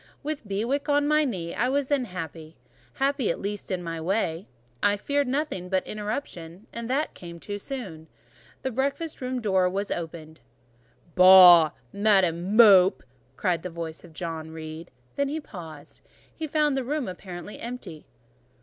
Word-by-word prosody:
With 290 -6 -4
Bewick 235 +9 -2
on 290 0 +3
my 305 +1 +3
knee, 185 - -3
I 250 +3 0
was 280 0 0
then 280 -3 +1
happy: 165 -4 -8 0.4
happy 275 -3 0
at - - -1
least 205 0 -5
in 185 -2 -2
my 165 -1 -5
way. 175 -1 -1 0.3
I 205 0 +3
feared 285 +6 0
nothing 255 - -2
but 190 0 0
interruption, 210 -4 -6
and 235 0 -5
that 280 +4 0
came 170 -1 -10
too 205 +3 -6
soon. 195 - -7 0.6
The 260 - -1
breakfast 275 +6 -2
room 255 0 -2
door 190 -4 +2 0.2
opened. 160 -3 -8 0.7
"Boh! 180 -3 +9 0.2
Madam 195 -2 +2
Mope!" 195 -5 +7 0.3
cried 175 -2 0
the 180 - -5
voice 165 -1 -7
of 170 - -14
John 160 -1 -5
Reed; 160 +1 -8 0.3
then 280 0 +1
he 310 +2 -3
paused: 175 - -11 0.3
he 320 - -4
found 300 -1 +1
the 265 - -1
room 285 +1 -2
apparently 185 +1 -8
empty. 225 -10 -8
200 Hz, 155 wpm, -26 LUFS, 170-265 Hz, 0.7 s, Boh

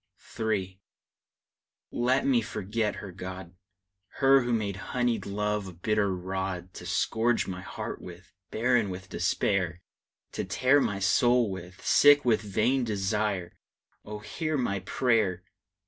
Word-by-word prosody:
III. 100 -4 -1 1.1
Let 125 +3 +1
me 130 -4 +3
forget 105 0 -2
her, 100 - -8
God! 95 -1 -8 0.6
Her 135 0 +5
who 120 0 -2
made 105 -4 -1 0.2
honeyed 120 -5 0
love 105 0 -1
a 95 - -8
bitter 100 +3 0
rod 95 0 -4
To - - -9
scourge 115 +1 +1
my 95 -1 -5
heart 95 - -6
with, 90 0 -12 0.2
barren 115 -2 +2
with 95 0 -7
despair; 90 -3 0 0.5
To - - -3
tear 130 +9 +3
my 100 - -1
soul 120 +4 +3
with, 95 0 -9
sick 145 -1 +6
with 115 -3 +3
vain 115 +6 +1
desire! 105 -3 -2 0.4
Oh, 105 0 -7
hear 155 +9 -3
my 100 -7 -1
prayer! 105 -5 +1
105 Hz, 130 wpm, -28 LUFS, 95-120 Hz, 1.1 s, sick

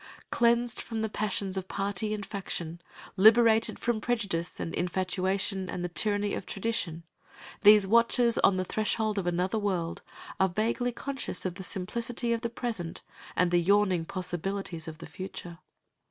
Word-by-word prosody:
Cleansed 235 0 +2
from 225 -1 -4
the 220 - -1
passions 200 -2 -2
of 190 0 -3
party 200 +2 -2
and 210 -2 -3
faction, 175 -4 -5 0.4
liberated 225 +2 +6
from 235 -2 -1
prejudice 200 -8 -1
and 165 - -4
infatuation 185 +1 -1
and 175 - -4
the - - -3
tyranny 205 +2 0
of - - -4
tradition, 190 -6 -2 0.6
these 210 -1 +8
watchers 235 +2 +4
on 190 - +4
the 185 - -1
threshold 215 +1 0
of 180 - -3
another 180 +5 0
world 180 -5 -2 0.4
are 190 - +4
vaguely 230 +6 0
conscious 270 -6 -4
of 185 - -1
the 190 - -8
simplicity 235 +6 -2
of 230 - -2
the 235 - -2
present 225 -8 -4 0.3
and 180 -1 +2
the 175 0 +4
yawning 190 -1 +3
possibilities 180 -1 -4
of 160 -1 -7
the - - -9
future. 180 -2 -8
200 Hz, 155 wpm, -29 LUFS, 180-225 Hz, 0.6 s, these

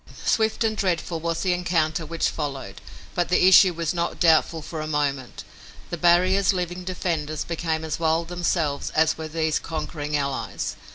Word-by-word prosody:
Swift 220 +1 +1
and 220 -1 0
dreadful 175 -3 -1
was 165 0 -2
the 185 -2 +2
encounter 165 -2 0
which 165 -1 0
followed, 135 -10 -5 0.3
but 175 -2 -1
the 180 - +3
issue 185 0 +8
was 165 -1 -2
not 170 -1 -2
doubtful 160 -1 +3
for 155 0 -6
a 155 - -4
moment. 140 -4 -2 0.5
The - - -1
barrier's 185 +4 +4
living 180 0 -3
defenders 165 -4 -2
became 160 -1 -2
as 160 0 -3
wild 165 0 +1
themselves 170 -4 -1
as 160 0 +3
were 160 0 -6
these 160 0 0
conquering 150 -2 -3
allies. 140 -1 -3
165 Hz, 165 wpm, -24 LUFS, 155-175 Hz, 0.5 s, issue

